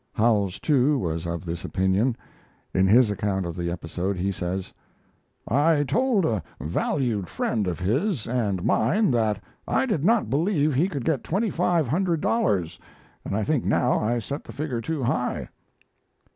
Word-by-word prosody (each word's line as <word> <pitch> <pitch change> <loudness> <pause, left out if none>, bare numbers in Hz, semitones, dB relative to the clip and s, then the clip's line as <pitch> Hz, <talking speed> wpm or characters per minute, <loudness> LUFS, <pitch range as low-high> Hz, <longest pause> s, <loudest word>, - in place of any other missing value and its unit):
Howells, 105 -4 +2
too, 145 -1 +2
was 85 -6 -2
of 85 0 -4
this 85 0 -4
opinion. 100 +6 +1 0.6
In 95 0 +3
his 115 +2 +5
account 100 -2 -1
of 85 -1 -4
the 85 -1 -2
episode 90 +3 -3
he 95 +3 0
says: 90 +1 -4 0.7
I 145 +4 +3
told 210 - +2
a 110 -7 0 0.2
valued 100 - -1
friend 105 -4 -1
of 90 - -2
his 130 - 0
and 105 -7 -1
mine 190 - +2
that 110 -4 0 0.2
I - - +2
did 210 - -1
not 225 +4 +3
believe 155 0 +1
he 150 +8 +2
could 140 -9 -4
get 155 -6 0
twenty 200 +4 0
five 170 -4 +1
hundred 170 +4 +1
dollars, 100 - 0 0.4
and - - -3
I 110 - 0
think 145 0 0
now 125 - +2
I 120 +3 0
set 140 +6 -5
the 115 - -10
figure 130 -2 -3
too 155 +2 -3
high. 120 - -1
115 Hz, 165 wpm, -25 LUFS, 95-150 Hz, 0.7 s, his